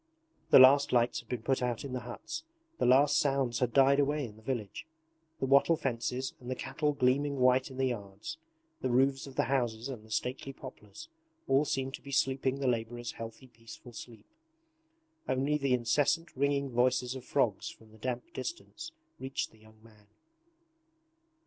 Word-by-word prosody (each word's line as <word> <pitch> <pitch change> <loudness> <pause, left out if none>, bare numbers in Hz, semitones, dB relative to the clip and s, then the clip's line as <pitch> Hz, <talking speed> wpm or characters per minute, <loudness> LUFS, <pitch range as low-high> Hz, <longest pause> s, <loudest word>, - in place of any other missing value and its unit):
The - - +8
last 135 +2 +7
lights 120 -1 +2
had - - -15
been 120 -3 -3
put 135 +1 +1
out 125 0 -2
in 135 - -6
the 130 - -1
huts. 120 - -7 0.4
The - - +2
last 140 +4 +5
sounds 135 -5 +1
had 125 -2 +1
died 135 +2 +5
away 145 0 +1
in 105 -3 -10
the 110 - -17
village. 115 +2 -4 0.5
The - - 0
wattle 140 +5 +5
fences 130 0 -2
and 125 - -9
the 130 - -1
cattle 150 +3 -1
gleaming 140 +2 +1
white 130 +1 +4
in 130 - -10
the 135 - +1
yards, 105 - -6 0.4
the 130 - 0
roofs 135 +3 +2
of 135 - -11
the - - +2
houses 120 -2 -1
and 120 -5 -7
the 110 - -17
stately 130 +5 -3
poplars, 105 -7 -11 0.4
all 135 +3 +3
seemed 135 -1 -2
to - - -7
be 140 - -10
sleeping 135 -2 +1
the 135 - -1
labourers' 120 0 -2
healthy 115 +3 -9
peaceful 120 0 -13
sleep. 115 0 -10 1.0
Only 135 +3 +1
the 135 -2 +2
incessant 145 +7 +1
ringing 140 0 0
voices 125 +1 +2
of 130 -2 -7
frogs 125 -7 0
from 110 -1 -15
the 110 - -17
damp 130 - -4
distance 325 -1 -6 0.3
reached 135 0 -3
the 110 - -21
young 110 0 -20
man. 105 -2 -20
130 Hz, 180 wpm, -31 LUFS, 120-140 Hz, 1.0 s, The